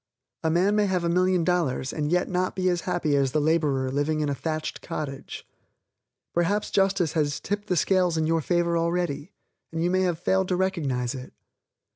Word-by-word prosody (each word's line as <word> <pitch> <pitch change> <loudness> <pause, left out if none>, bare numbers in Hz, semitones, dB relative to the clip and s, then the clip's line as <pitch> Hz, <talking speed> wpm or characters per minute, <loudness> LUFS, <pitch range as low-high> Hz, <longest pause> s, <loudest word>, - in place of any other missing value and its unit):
A 160 - +2
man 185 +5 +3
may 210 -1 +3
have 185 -2 0
a 170 - +1
million 180 0 +2
dollars, 165 -7 0
and 150 0 -2
yet 180 +1 +2
not 185 0 -1
be 185 -1 +1
as 175 -1 0
happy 150 -4 +1
as 135 -2 +1
the 155 - +3
laborer 145 -4 +1
living 150 +3 0
in 150 - 0
a - - 0
thatched 155 +4 -4
cottage. 150 -5 -6 0.9
_Perhaps 180 +5 +1
Justice 195 -5 +2
has 150 -3 0
tipped 205 +1 -3
the 180 - +1
scales 180 -1 +2
in 160 - +1
your 165 +1 +1
favor 170 +1 +1
already 170 -1 -1 0.4
and 165 0 -2
you 175 - +1
have 185 -3 +1
failed 190 +2 +1
to 180 - +1
recognize 145 -10 -1
it. 130 -1 -8
170 Hz, 190 wpm, -26 LUFS, 150-185 Hz, 0.9 s, man